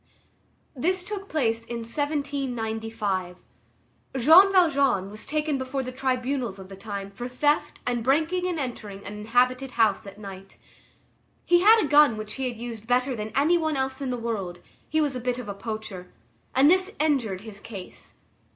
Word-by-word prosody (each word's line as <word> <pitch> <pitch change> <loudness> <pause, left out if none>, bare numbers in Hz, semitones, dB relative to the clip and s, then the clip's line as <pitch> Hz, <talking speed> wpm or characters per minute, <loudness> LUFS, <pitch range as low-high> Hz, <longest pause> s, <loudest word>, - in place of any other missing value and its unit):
This 360 +7 0
took 395 0 -6
place 230 -7 0
in 235 0 -5
1795. 225 - -2 0.8
Jean 325 +10 +8
Valjean 280 - +3
was 215 - -8
taken 300 -1 0
before 260 +1 -3
the 255 - -5
tribunals 255 -4 -1
of 190 -1 -11
the 195 - -9
time 200 0 -6
for 240 +5 -6
theft 295 +4 0
and 240 -2 -1
breaking 320 +8 +1
and 355 -2 -2
entering 210 -7 -6
an 205 - -6
inhabited 250 +5 +1
house 220 -2 +2
at 195 - -10
night. 195 -2 -10 0.9
He 350 0 +5
had 440 +4 +7
a - - 0
gun 290 -6 +6
which 215 0 -6
he 265 -1 -2
used 230 -2 -6
better 250 +2 +2
than 215 -1 -5
any 315 +6 +4
one 315 -3 0
else 265 +1 -2
in 270 - -2
the 250 - -2
world, 200 -7 -4 0.3
he 315 - +1
was 290 -3 +1
a - - -2
bit 250 0 -1
of 250 -4 -7
a 200 - -3
poacher, 200 -3 -6 0.4
and 270 +2 +6
this 370 +3 +4
injured 255 -11 +1
his 210 -2 -10
case. 200 -4 -10
250 Hz, 170 wpm, -26 LUFS, 215-290 Hz, 0.9 s, Jean